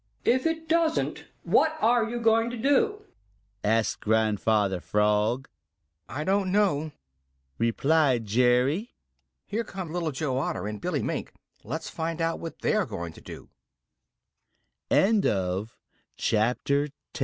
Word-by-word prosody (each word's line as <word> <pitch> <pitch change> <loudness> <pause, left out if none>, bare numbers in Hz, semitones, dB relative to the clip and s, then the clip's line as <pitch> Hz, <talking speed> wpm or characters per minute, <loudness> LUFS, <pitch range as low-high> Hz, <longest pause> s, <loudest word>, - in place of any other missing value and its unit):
"If 260 +5 +3
it 325 0 -3
doesn't, 325 0 +1 0.2
what 315 0 +3
are 230 -2 +3
you 240 +1 -3
going 225 0 +3
to 240 - -5
do?" 415 - +1 0.6
asked 110 +1 +1
Grandfather 110 -3 +1
Frog. 105 +6 +1 0.6
"I 145 +4 -4
don't 195 +2 +1
know," 175 -7 +1 0.7
replied 130 +1 +2
Jerry 125 - +3
Muskrat. 230 +4 -13 0.5
"Here 220 +3 -2
come 185 -6 -7
Little 170 -3 -1
Joe 130 -2 -1
Otter 135 - -2
and 105 -1 -5
Billy - - -1
Mink; - - -3 0.3
let's 150 +9 -5
find 165 0 -3
out 165 0 0
what 165 - -8
they - - +2
are 215 -3 +1
going 85 -2 -6
to - - -14
do." - - -11 2.7
CHAPTER 125 +6 +1
XI: 145 - -19 0.2
Five - - -7
155 Hz, 130 wpm, -27 LUFS, -, 2.7 s, If